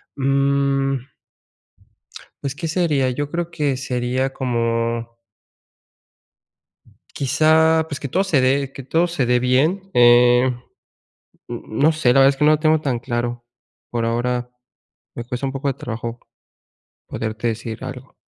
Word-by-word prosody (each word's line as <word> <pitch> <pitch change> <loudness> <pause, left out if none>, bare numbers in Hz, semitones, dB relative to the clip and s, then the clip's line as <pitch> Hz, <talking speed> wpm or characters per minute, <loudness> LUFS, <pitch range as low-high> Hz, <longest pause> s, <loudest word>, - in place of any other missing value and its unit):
mm 140 0 +1 1.5
Pues, 140 0 -3
¿qué 165 +1 -4
sería? 155 -6 +1
Yo 145 +3 -3
creo 170 +1 -3
que 145 -4 -1
sería 130 +1 -2
como 115 -2 -1 2.1
quizá, 160 +3 +3
pues, 145 - -5
que 140 - -5
todo 185 +9 +1
se 180 -8 +2
dé 135 +1 +1
que 135 - -9
todo 165 +7 +1
se 165 -7 -1
dé 125 0 +2
bien, 155 +11 +1
eh 120 +1 +6 1.0
n 120 -1 -5
no 140 +8 +2
sé, 155 -5 +1
la 135 - +4
verdad 135 0 +7
es 135 - -2
que 150 - +2
no 150 - +6
lo 155 - +2
tengo 155 0 +3
tan 135 -5 -2
claro. 120 0 -3 0.5
Por 115 -1 -2
ahora, 120 +1 -1 0.7
me 120 - -5
cuesta 125 +2 -4
un - - -3
poco 140 +1 -3
de - - -1
trabajo, 115 -2 -6 0.9
poderte 110 +1 -4
decir 115 +1 -4
algo. 130 0 -8
135 Hz, 145 wpm, -20 LUFS, 120-145 Hz, 2.1 s, verdad